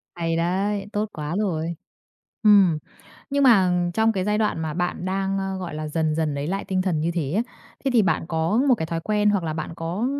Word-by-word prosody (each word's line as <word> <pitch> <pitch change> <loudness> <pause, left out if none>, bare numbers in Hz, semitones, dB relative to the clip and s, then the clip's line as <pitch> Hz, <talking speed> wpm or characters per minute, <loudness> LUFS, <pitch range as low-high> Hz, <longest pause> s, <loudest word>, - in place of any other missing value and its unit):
Hay 165 -1 -1
đấy, 195 +4 0
tốt 210 +1 -1
quá 150 +2 -4
rồi! 170 -5 -1 0.7
Ừm. 200 -6 +6 0.5
Nhưng 280 0 +1
mà 195 -8 +5 0.2
trong 225 0 +3
cái 190 -2 -1
giai 210 0 +1
đoạn 210 -6 0
mà 155 -1 -3
bạn 175 0 -2
đang, 195 +1 -1
ơ, 195 0 -2
gọi 180 -4 -5
là, 155 0 -4
dần 155 0 0
dần 155 -2 0
lấy 140 +1 -3
lại 195 +4 -2
tinh 185 -1 0
thần 175 -5 0
như 165 +2 0
thế 160 -5 -2
á, 215 +6 +2 0.4
thế 270 - +2
thì 230 - +6
bạn 190 - +1
có 165 +5 0
một 255 - +6
cái 160 -7 -3
thói 165 0 -3
quen 210 +3 +2
hoặc 200 -4 0
là 160 - -2
bạn 155 +1 -5
có 175 +8 -2
185 Hz, 230 wpm, -24 LUFS, 160-205 Hz, 0.7 s, Ừm